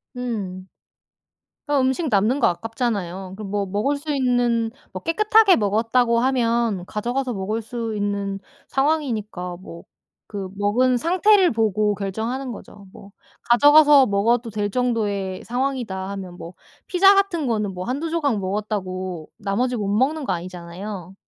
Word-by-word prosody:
음. 200 Hz, -7 st, -5 dB, 1.0 s
아 290 Hz, -1 st, +1 dB
음식 265 Hz, +5 st, 0 dB
남는 220 Hz, +6 st, +2 dB
거 -, -, +4 dB
아깝잖아요. 195 Hz, -3 st, -3 dB
그 215 Hz, -, -8 dB
뭐 200 Hz, 0 st, -2 dB
먹을 210 Hz, +9 st, 0 dB
수 295 Hz, 0 st, -3 dB
있는 245 Hz, -3 st, +1 dB, 0.2 s
뭐 185 Hz, -, -7 dB
깨끗하게 425 Hz, +3 st, +4 dB
먹었다고 230 Hz, +3 st, +2 dB
하면 235 Hz, -6 st, +1 dB
가져가서 245 Hz, +3 st, -2 dB
먹을 205 Hz, +4 st, -2 dB
수 230 Hz, 0 st, -4 dB
있는 200 Hz, -1 st, -2 dB, 0.3 s
상황이니까 230 Hz, -, -1 dB
뭐 170 Hz, -2 st, -11 dB, 0.5 s
그 200 Hz, -2 st, -4 dB
먹은 245 Hz, +5 st, +2 dB
상태를 370 Hz, -, +4 dB
보고 215 Hz, -2 st, +1 dB
결정하는 225 Hz, +7 st, -4 dB
거죠. 205 Hz, -2 st, -12 dB
뭐 200 Hz, 0 st, -14 dB, 0.4 s
'가져가서 290 Hz, +3 st, +7 dB
먹어도 230 Hz, +2 st, +1 dB
될 210 Hz, -1 st, -2 dB
정도의 205 Hz, -6 st, -1 dB
상황이다.' 240 Hz, -7 st, -3 dB
하면 185 Hz, -3 st, -7 dB
뭐 170 Hz, -, -9 dB, 0.3 s
피자 390 Hz, +2 st, +5 dB
같은 380 Hz, -7 st, +1 dB
거는 210 Hz, -4 st, -1 dB
뭐 180 Hz, 0 st, -6 dB
1-2 290 Hz, +6 st, -2 dB
조각 290 Hz, -9 st, 0 dB
먹었다고 185 Hz, -4 st, -4 dB
나머지 245 Hz, +6 st, -1 dB
못 205 Hz, -3 st, -2 dB
먹는 270 Hz, +9 st, +1 dB
거 185 Hz, -, 0 dB
아니잖아요. 180 Hz, +2 st, -7 dB
225 Hz, 290 characters per minute, -22 LUFS, 195-260 Hz, 1.0 s, 가져가서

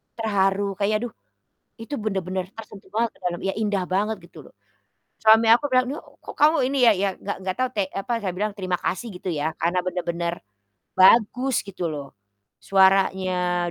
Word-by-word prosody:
terharu 200 Hz, -2 st, 0 dB
kayak 205 Hz, +1 st, +1 dB
aduh 245 Hz, -, -4 dB, 0.7 s
itu 225 Hz, +5 st, -9 dB
bener-bener 190 Hz, -3 st, -3 dB
tersentuh 215 Hz, -3 st, -11 dB
banget 230 Hz, +2 st, 0 dB
ke -, -, -25 dB
dalam, 175 Hz, -1 st, -2 dB
ya 195 Hz, -, 0 dB
indah 205 Hz, -3 st, 0 dB
banget 210 Hz, +3 st, 0 dB
gitu 170 Hz, -, -14 dB
loh. -, -, -26 dB, 0.6 s
Suami 220 Hz, +1 st, +5 dB
aku 235 Hz, +5 st, +5 dB
bilang, 255 Hz, 0 st, +4 dB
"Ini 280 Hz, -, -3 dB, 0.2 s
kok -, -, -10 dB
kamu 305 Hz, +2 st, +5 dB
ini 275 Hz, +1 st, -1 dB
ya" 230 Hz, -, +7 dB
ya 200 Hz, -, +2 dB
nggak 200 Hz, -, -5 dB
nggak 190 Hz, -1 st, -3 dB
tau 255 Hz, 0 st, 0 dB
te 200 Hz, -5 st, -1 dB
apa, 195 Hz, +5 st, -5 dB
saya 190 Hz, -4 st, -3 dB
bilang, 210 Hz, +2 st, -1 dB
"terima 185 Hz, -3 st, -2 dB
kasih," 185 Hz, +7 st, -2 dB
gitu 180 Hz, -, -7 dB
ya. 155 Hz, +1 st, -2 dB
Karena 175 Hz, +2 st, 0 dB
bener-bener 175 Hz, -1 st, -3 dB, 0.6 s
bagus 235 Hz, +6 st, +4 dB
gitu 190 Hz, -3 st, -5 dB
loh 145 Hz, -4 st, -5 dB, 0.5 s
suaranya, 185 Hz, -2 st, +2 dB
195 Hz, 175 wpm, -24 LUFS, 180-220 Hz, 0.7 s, ya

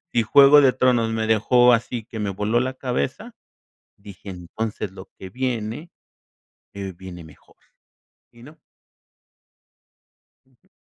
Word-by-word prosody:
si 120 Hz, -, +2 dB
Juego 140 Hz, +5 st, +7 dB
de 135 Hz, -2 st, +4 dB
Tronos 125 Hz, -3 st, +1 dB
me 110 Hz, 0 st, -2 dB
dejó 120 Hz, +3 st, +4 dB
así 115 Hz, -1 st, -1 dB
que 110 Hz, -2 st, -8 dB
me 100 Hz, -1 st, -2 dB
voló 105 Hz, +5 st, -1 dB
la 130 Hz, +1 st, -2 dB
cabeza, 135 Hz, -, -4 dB, 0.6 s
dije: 100 Hz, 0 st, -14 dB
"Entonces 95 Hz, +3 st, -6 dB
lo 95 Hz, 0 st, -12 dB
que 95 Hz, -1 st, -10 dB
viene, 125 Hz, +4 st, -4 dB, 0.8 s
eh 100 Hz, -1 st, -6 dB
viene 90 Hz, -3 st, -10 dB
mejor", 80 Hz, -, -19 dB, 0.8 s
y 120 Hz, 0 st, -18 dB
no. 155 Hz, +4 st, -15 dB, 1.9 s
Ujú. 130 Hz, +8 st, -34 dB
115 Hz, 130 wpm, -22 LUFS, 100-130 Hz, 1.9 s, Juego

